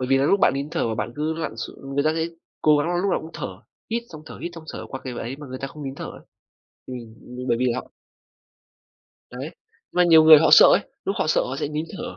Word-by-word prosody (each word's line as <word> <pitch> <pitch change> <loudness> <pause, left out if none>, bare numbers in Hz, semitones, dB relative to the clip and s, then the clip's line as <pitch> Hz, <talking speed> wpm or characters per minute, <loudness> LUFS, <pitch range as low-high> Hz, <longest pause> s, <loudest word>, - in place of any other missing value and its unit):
bởi 130 - -2
vì 135 0 +4
là 135 - +2
lúc 195 +7 +3
bạn - - +5
nín 140 +3 -4
thở - - -1
mà 110 - -2
bạn 115 - -3
cứ 155 +2 -1
lặn 160 -8 -4
x 115 - -5
người 140 +1 -1
ta 155 - +3
sẽ 165 0 0 0.4
cố 150 -1 +5
gắng 145 +3 0
là 175 - 0
lúc 195 +3 0
nào - - +1
cũng 160 - -10
thở, - - -4 0.4
hít 235 +1 -1
xong 155 -1 -11
thở, - - -10
hít 170 - -5
xong 165 -1 -10
thở - - -7
qua 130 - -6
cái 130 - -4
ấy 125 +4 -5
mà 145 0 -10
người 130 0 -7
ta 135 - -4
không 150 +2 -10
nín 135 - -5
thở - - -7
ấy. - - -9 0.7
Ừm, 130 - -6 0.4
b 125 +1 -6
bởi 120 - +3
vì 125 - 0
là 120 +2 -1
họ - - -18 1.4
Đấy, 130 +5 -6 0.4
mà 180 0 +4
nhiều 160 -2 +7
người 155 -1 +10
họ 160 - +3
sợ - - +10
ấy, - - +5 0.2
lúc 195 - -2
họ - - +1
sợ 155 - +3
họ 130 +2 -4
sẽ 150 - -1
nín 155 +1 -3
thở. 245 +1 -6
150 Hz, 285 wpm, -23 LUFS, 130-160 Hz, 1.4 s, người